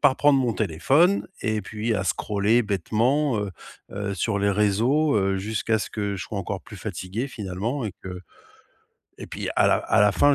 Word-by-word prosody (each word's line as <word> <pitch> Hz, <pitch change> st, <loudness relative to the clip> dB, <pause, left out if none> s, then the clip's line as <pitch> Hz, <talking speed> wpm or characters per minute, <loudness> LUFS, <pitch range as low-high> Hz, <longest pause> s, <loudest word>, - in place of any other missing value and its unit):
par 130 Hz, -, +5 dB
prendre 145 Hz, -1 st, +4 dB
mon 125 Hz, -3 st, +1 dB
téléphone 115 Hz, -, +2 dB
et 110 Hz, -2 st, -1 dB
puis 110 Hz, +3 st, -2 dB
à 100 Hz, -2 st, -1 dB
scroller 105 Hz, +5 st, +1 dB
bêtement, 115 Hz, -, +1 dB
heu 100 Hz, -1 st, -2 dB, 0.4 s
heu, 100 Hz, 0 st, -3 dB
sur 100 Hz, 0 st, -1 dB
les 100 Hz, 0 st, +2 dB
réseau, 110 Hz, +8 st, +2 dB
heu, 95 Hz, -1 st, +1 dB
jusqu'à 110 Hz, +2 st, 0 dB
ce -, -, -4 dB
que 100 Hz, -2 st, -3 dB
je 90 Hz, -, -5 dB
sois 100 Hz, +5 st, -5 dB
encore 95 Hz, 0 st, -4 dB
plus -, -, -12 dB
fatigué 100 Hz, +8 st, -4 dB
finalement 110 Hz, +5 st, -3 dB
et 100 Hz, -, -5 dB
que 90 Hz, -1 st, -7 dB, 1.0 s
et -, -, -8 dB
puis -, -, -5 dB
à -, -, +5 dB
la -, -, +4 dB
à -, -, +1 dB
la 105 Hz, -1 st, +5 dB
fin 145 Hz, +8 st, +4 dB
105 Hz, 190 wpm, -24 LUFS, 100-120 Hz, 1.0 s, par